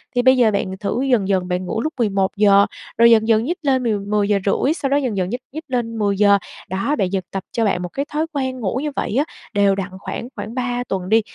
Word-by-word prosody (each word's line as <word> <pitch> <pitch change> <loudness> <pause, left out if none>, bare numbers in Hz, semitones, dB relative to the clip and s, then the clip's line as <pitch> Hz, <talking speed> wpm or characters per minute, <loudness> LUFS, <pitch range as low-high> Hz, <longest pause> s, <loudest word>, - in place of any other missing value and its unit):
thì 245 - +3
bây 260 +1 +5
giờ 235 -3 +4
bạn 190 -2 -2
thử 210 +4 -1
dần 245 -8 +2
dần, 190 -2 +1
bạn 180 0 -2
ngủ 220 - -2
lúc 310 +4 -2
11:00, 200 -1 +3 0.3
rồi 235 +1 +7
dần 220 -1 +5
dần 225 -1 +3
nhích 340 +8 -2
lên 265 -4 +1
mười 220 -4 0
mười 205 0 0
giờ 205 -1 +3
rưỡi, 265 +8 +2
sau 285 -5 -3
đó 280 - +3
dần 255 -8 -1
dần 185 -1 0
nhích 245 +4 -4
nhích 315 +4 -7
lên 240 -4 -2
10:00. 200 -1 +4 0.3
Đó, 195 +10 0
bạn 195 -9 0
dần 190 -2 -1
tập 195 -1 -4
cho 230 - 0
bạn 195 -3 0
một 180 - -4
cái 280 - -2
thói 305 +1 0
quen 260 -2 -2
ngủ 225 +2 -1
như 300 - -2
vậy - - -2
á, 290 - +3 0.3
đều 200 -1 +3
đặn 195 0 -4
khoảng 235 - -5
khoảng 220 - -6
3 245 -1 -1
tuần 190 -5 -4
đi, 225 +1 +5
220 Hz, 260 wpm, -20 LUFS, 195-255 Hz, 0.3 s, rồi